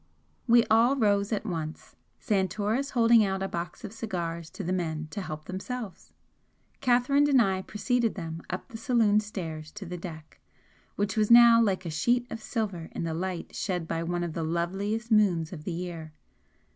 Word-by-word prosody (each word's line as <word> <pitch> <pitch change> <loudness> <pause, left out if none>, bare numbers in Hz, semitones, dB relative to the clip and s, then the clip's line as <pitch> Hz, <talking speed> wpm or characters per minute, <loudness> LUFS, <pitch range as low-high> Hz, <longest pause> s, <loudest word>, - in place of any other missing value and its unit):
We 235 0 +6
all 230 +5 +4
rose 205 -4 +2
at 215 0 -1
once, 160 -6 -5 0.2
Santoris 210 +6 0
holding 230 -2 +5
out 195 -1 -1
a - - -1
box 170 +5 -5
of 210 -1 -7
cigars 170 -7 -4
to 195 - -7
the 180 +1 -1
men 160 -4 -2
to 200 - -4
help 155 -4 -6
themselves. 200 +1 -6 0.7
Catherine 275 +3 +3
and 270 -2 +5
I 190 -4 +2
preceded 235 +3 -1
them 165 -3 -6
up 185 - -5
the 225 - -8
saloon 225 -5 +3
stairs 165 -7 -6
to 210 -2 -8
the 180 0 -6
deck, 160 -3 -9 0.6
which 200 -1 -1
was 215 -2 +2
now 235 -1 +8
like 190 -4 +1
a 165 - -3
sheet 240 +10 +1
of 225 - -5
silver 200 -8 -3
in - - -3
the 165 -1 -2
light 180 +1 -4
shed 180 -4 -2
by 165 - -2
one 175 +1 -2
of 170 -2 -4
the 165 - -3
loveliest 195 +8 -2
moons 185 -7 +3
of 155 -3 -9
the - - -2
year. 165 -2 -6
195 Hz, 185 wpm, -28 LUFS, 170-225 Hz, 0.7 s, now